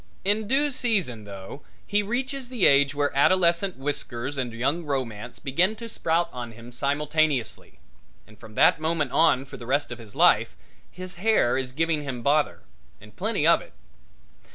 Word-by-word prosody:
In 205 +2 +1
due 285 +5 +2
season, 190 - 0
though, 100 +7 -9 0.2
he 205 0 +1
reaches 255 +4 -3
the 245 -7 +1
age 140 0 +4
where 145 -1 0
adolescent 175 +4 +3
whiskers 135 -1 -3
and 130 -3 -3
young 135 +9 -1
romance 125 -6 -4
begin 175 +10 +1
to 230 +1 -8
sprout 170 -6 0
out - - -26
on 120 -2 -6
him 115 +2 -12
simultaneously 145 0 -1 0.5
and 105 -1 -19
from 110 -2 -13
that - - +5
moment 155 -4 -1
on 155 -5 +3
for 135 0 -10
the 120 -2 -10
rest 140 0 0
of 120 - -6
his 110 -3 -12
life - - +4 0.3
his 185 -1 -7
hair 200 - +2
is 130 -1 -2
giving 160 +2 0
him 130 -4 -5
bother, 145 +1 +1 0.4
and - - -16
plenty - - -1
of - - +5
it. - - -15
145 Hz, 175 wpm, -25 LUFS, 125-185 Hz, 0.5 s, that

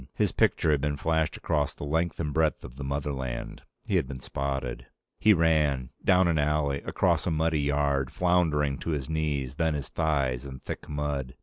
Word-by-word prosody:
His - - +1
picture 80 - +2
had 75 -2 +2
been 75 0 -1
flashed 80 +1 0
across 75 -4 -1
the - - -8
length 80 +4 -1
and 75 -3 -2
breadth 80 0 +1
of - - -10
the 70 - -6
motherland. 70 -2 -3 0.2
He - - +1
had - - 0
been 70 -1 -6
spotted. 65 -1 -4 0.3
He 110 - +5
ran. 75 -7 +2
Down 90 -1 +5
an 80 -2 +2
alley, 75 -1 +1
across - - +1
a - - +3
muddy 80 -1 +1
yard, 70 -2 +1
floundering 80 -6 +1
to - - -5
his 70 +2 -6
knees, 70 -4 -1
then 80 -2 +1
his 70 -2 -4
thighs, 70 -6 0
in 65 -1 -7
thick - - -7
mud. 75 -3 -3
75 Hz, 190 wpm, -28 LUFS, 70-80 Hz, 0.3 s, He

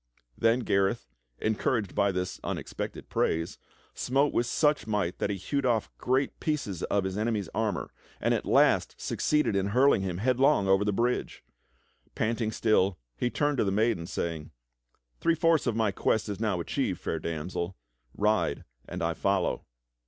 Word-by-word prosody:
Then 115 +2 +2
Gareth, 100 0 +1 0.3
encouraged 110 -1 0
by 100 -1 +2
this 90 0 -3
unexpected - - -5
praise, 80 +1 -1 0.3
smote 140 +3 +1
with 120 - +1
such 150 +1 +2
might 100 -5 -1
that - - 0
he 100 - -1
hewed 140 +9 -2
off 120 -4 0
great 130 +2 0
pieces 140 - -2
of 100 -1 0
his 95 +2 -3
enemy's 110 -4 -1
armor 110 -4 -1 0.3
and - - +2
at - - 0
last - - +3
succeeded 150 -8 +1
in 100 0 +1
hurling 125 +2 +4
him 90 -2 -2
headlong 130 0 +3
over 95 +1 +4
the 105 - +1
bridge. 120 +5 -1 0.7
Panting 115 0 0
still, 100 -5 +2 0.2
he 120 - 0
turned 145 +2 0
to - - +4
the 100 - +1
maiden, 105 -4 +1
saying: 80 -5 -3 0.7
"Three 165 - +2
fourths 165 -3 +3
of 115 - +1
my 110 -2 +2
quest 105 +2 0
is 100 - -4
now 105 -5 0
achieved. 85 - -1
Fair - - -3
Damsel; 85 +3 -4 0.4
ride 105 +1 +1 0.3
and - - -4
I - - +1
follow." - - 0
110 Hz, 160 wpm, -28 LUFS, 95-125 Hz, 0.7 s, hurling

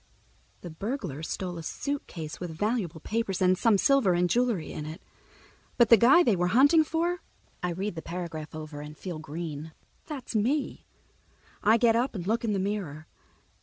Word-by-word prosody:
The 175 - -8
burglar 180 - -4
stole 175 +1 -4
a - - -5
suitcase 165 - -5
with 180 - -4
valuable 180 -1 -2
papers 215 -2 -2
and 185 0 +4
some 215 +2 +3
silver 255 -4 +4
and 180 +1 +2
jewelry 235 -6 0
in 150 - -6
it. 155 +2 -7 0.8
But 235 -3 +5
the 230 - +10
guy 250 - +6
they 230 - +3
were 180 0 +1
hunting 285 - +5
for—I 330 - -4
read 190 +4 -3
the 165 - -6
paragraph 165 -3 -6
over 155 -1 -7
and 150 0 -9
feel 175 -4 -6
green. 155 0 -6 0.3
That's 285 -6 -6
me. 260 +7 0 0.7
I 220 +2 +5
get 230 -1 +4
up 240 +1 0
and 175 -3 -4
look 225 +4 0
in 220 -2 0
the - - 0
mirror. 190 -6 -3
190 Hz, 170 wpm, -28 LUFS, 160-235 Hz, 0.8 s, the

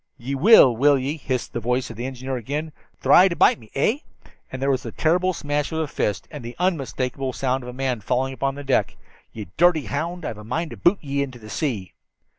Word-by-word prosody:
"Ye 125 +4 -5
will, 140 - +7
will 140 +4 +4
ye?" 135 +3 -2
hissed 130 -5 -3
the - - -2
voice 125 +2 -1
of - - -10
the 120 +4 -4
engineer 130 0 -5
again. 145 +6 -4 0.3
"Thry 185 +2 +6
to 170 - -2
bite - - +4
me, 110 -2 -17
eh?" 215 - +2 0.5
and 130 - -5
there 135 +1 +1
was 130 0 0
the - - -7
terrible 180 +3 +1
smash 145 -3 -2
of 160 - -3
a 160 - 0
fist, 105 -8 -2
and 150 -5 -8
the 120 +1 -7
unmistakable 135 -7 -1
sound 130 +1 -1
of 125 - -7
a - - -7
man 130 -3 -2
falling 130 +5 -1
upon 135 +1 -2
the 145 - -7
deck. 135 -1 0 0.3
"Ye 110 -2 -7
dirty 170 -3 +4
hound, 170 +4 -3
I've 110 - -5
a - - -10
mind 155 +9 -3
to - - -8
boot 180 +4 +3
ye 140 -1 -1
into 130 -3 -4
the 110 -2 -11
sea." 115 - -3
135 Hz, 235 wpm, -23 LUFS, 125-155 Hz, 0.5 s, will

